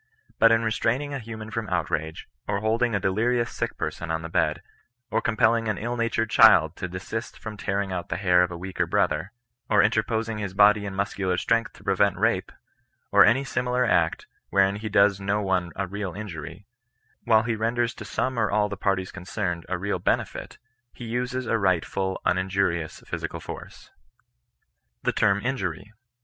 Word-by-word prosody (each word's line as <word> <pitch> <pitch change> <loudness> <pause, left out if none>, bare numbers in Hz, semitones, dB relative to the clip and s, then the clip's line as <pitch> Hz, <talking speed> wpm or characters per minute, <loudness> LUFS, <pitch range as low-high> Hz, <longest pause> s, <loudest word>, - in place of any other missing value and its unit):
But 115 0 +7
in 115 0 +3
restraining 120 +6 0
a 140 - -3
mad 115 - -13
man 110 0 -8
from 110 -2 -3
outrage, 80 -2 -2 0.2
or 100 -1 -1
holding 115 +1 +1
a - - +1
delirious 115 +6 +1
sick - - -3
person 85 - -4
on 80 0 -2
the 80 - -6
bed, - - 0 0.5
or - - +1
compelling 115 0 +2
an 110 - -1
ill 120 +3 -3
natured 115 -1 -1
child - - +6
to 90 - -3
desist 95 +6 -6
from 110 -1 -7
tearing 100 -1 -2
out 90 -2 -4
the 80 - -2
hair 90 -2 +4
of 90 - +2
a 85 - -6
weaker 95 +2 -2
brother, 95 +5 0 0.4
or 105 - +5
interposing 110 0 0
his 100 -2 -4
body 105 0 +5
and 95 - -6
muscular 100 -2 -1
strength 115 +4 0
to - - -17
prevent 100 +1 +2
rape, - - +1 0.6
or - - +8
any 125 +6 +4
similar 125 -1 0
act, 85 -7 +1 0.2
wherein 100 0 +3
he 110 +1 -5
does 100 -1 +4
no 100 +2 0
one 95 -3 0
a 100 - -2
real 100 -1 -5
injuiy, 85 -2 -8 0.6
while 110 -2 +5
he 115 0 -1
renders 115 +2 0
to - - -9
some 130 -2 -2
or 105 -3 +2
all 105 0 +1
the 100 - -4
parties 95 -2 -1
concerned 90 -2 -4
a 90 - -1
real 100 +3 -2
henefUi - - -2 0.4
he 120 - -9
uses 125 +2 -2
a 115 - +1
rightful 95 0 0
uninjurious 90 -3 0
physical - - -5
force. - - -10 1.1
THE - - +1
T£BM 100 +1 +2
INJUBT. 100 -6 -3
100 Hz, 180 wpm, -25 LUFS, 95-115 Hz, 1.1 s, or